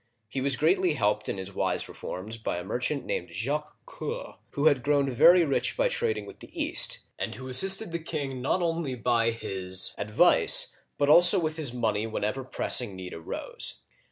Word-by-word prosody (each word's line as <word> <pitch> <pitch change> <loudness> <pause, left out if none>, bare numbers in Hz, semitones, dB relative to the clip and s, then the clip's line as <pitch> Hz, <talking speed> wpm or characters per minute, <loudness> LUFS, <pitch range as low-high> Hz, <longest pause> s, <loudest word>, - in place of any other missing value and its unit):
He 130 +5 -4
was 135 0 +2
greatly 175 - +2
helped 105 -3 0
in - - -3
his 95 +1 -7
wise - - -1
reforms 110 +5 -6
by 110 - -3
a 90 - -5
merchant 125 +7 -2
named 90 - -3
Jacques 145 - -3
Coeur - - -6
(zhak - - -16
ker), - - -26 0.2
who 145 - -1
had 145 -5 +4
grown 140 +1 +1
very 170 +8 +6
rich 140 - 0
by - - +2
trading 470 -2 -2
with - - -12
the - - -13
East, - - +1 0.2
and - - -3
who 130 - -9
assisted 190 - +1
the 170 - -3
king 140 -5 -5
not 175 +7 0
only 165 -5 -2
by 115 0 +1
his 95 -4 -1
advice, 105 +1 +4 0.2
but 145 - +1
also 175 +5 +7
with 155 -2 -2
his 155 -6 0
money 110 -3 -1
whenever 110 +4 -3
pressing 125 -4 0
need 95 -1 -8
arose. 80 - -4
130 Hz, 190 wpm, -27 LUFS, 105-155 Hz, 0.2 s, also